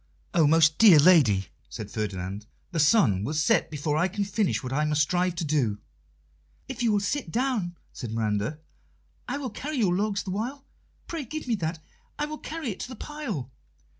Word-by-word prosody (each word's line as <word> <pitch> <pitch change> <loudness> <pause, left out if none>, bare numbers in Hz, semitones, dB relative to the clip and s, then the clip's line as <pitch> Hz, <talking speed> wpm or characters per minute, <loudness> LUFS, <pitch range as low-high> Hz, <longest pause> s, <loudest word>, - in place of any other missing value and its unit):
"Oh, 165 -5 +4
most 155 0 +4
dear 205 -8 +9
lady!" 140 - +5 0.2
said 105 -1 -7
Ferdinand, 100 -1 -4 0.2
"the 170 - -2
sun 145 - +4
will 150 +8 -2
set 150 - +2
before 150 0 -1
I 175 +4 +3
can 200 +2 -2
finish 200 -4 0
what 130 0 -4
I 150 +2 +1
must 150 -1 +2
strive 180 +3 0
to 165 - -2
do." 135 -9 +1 0.9
"If 260 -2 -6
you 235 -2 +3
will 205 - +3
sit 205 - -2
down," 225 -8 -1 0.2
said 120 - -6
Miranda, 110 +4 -1 0.7
"I - - -2
will 265 -5 -4
carry 295 +6 -5
your 200 -7 +2
logs 200 +1 0
the 190 - -5
while. 250 +8 -4 0.4
Pray 330 -3 -4
give 305 +3 -6
me 240 - +1
that; 165 -2 -2 0.4
I 295 - 0
will 305 0 -7
carry 315 -7 -4
it 190 - -8
to - - -4
the 255 - -8
pile." 220 - -5
175 Hz, 195 wpm, -27 LUFS, 145-230 Hz, 0.9 s, dear